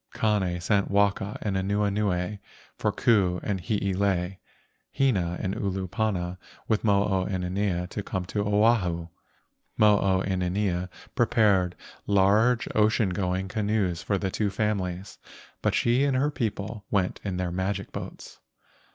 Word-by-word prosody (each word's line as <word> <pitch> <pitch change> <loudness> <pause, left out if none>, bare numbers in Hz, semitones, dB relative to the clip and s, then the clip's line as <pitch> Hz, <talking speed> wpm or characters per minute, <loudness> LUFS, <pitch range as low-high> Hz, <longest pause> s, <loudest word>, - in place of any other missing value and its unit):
Kane 100 -5 +1
sent 100 +3 +1
Waka 100 0 +1
and 100 -3 -1
Anuenue 100 0 0 0.4
for - - 0
Ku 95 -6 +2
and 100 -3 -2
Hiilei, 95 -3 0 0.5
Hina 95 -11 +1
and 95 - -2
Olopana 95 -1 -2 0.3
with 110 -2 +1
Mo 100 -2 +4
o 95 -2 0
inanea 90 -1 -1
to 105 - -4
come 95 -2 -4
to 100 +3 -2
Oahu. 100 -5 +2 0.7
Mo 105 -1 +5
o 95 -1 +2
inanea 90 -1 -1 0.2
prepared 95 -5 +3 0.3
large 105 +5 +3
ocean 105 -1 +3
going 95 0 -1
canoes 100 -4 0
for 100 - 0
the 95 0 -2
two 105 +1 0
families, 100 -2 -2 0.4
but - - +1
she 120 +3 +3
and 140 -2 +2
her 145 +3 +1
people 110 -4 -3
went 95 -3 0
in 95 -3 -3
their 90 -1 -2
magic 95 +2 -2
boats. - - -8
100 Hz, 135 wpm, -26 LUFS, 90-105 Hz, 0.7 s, Mo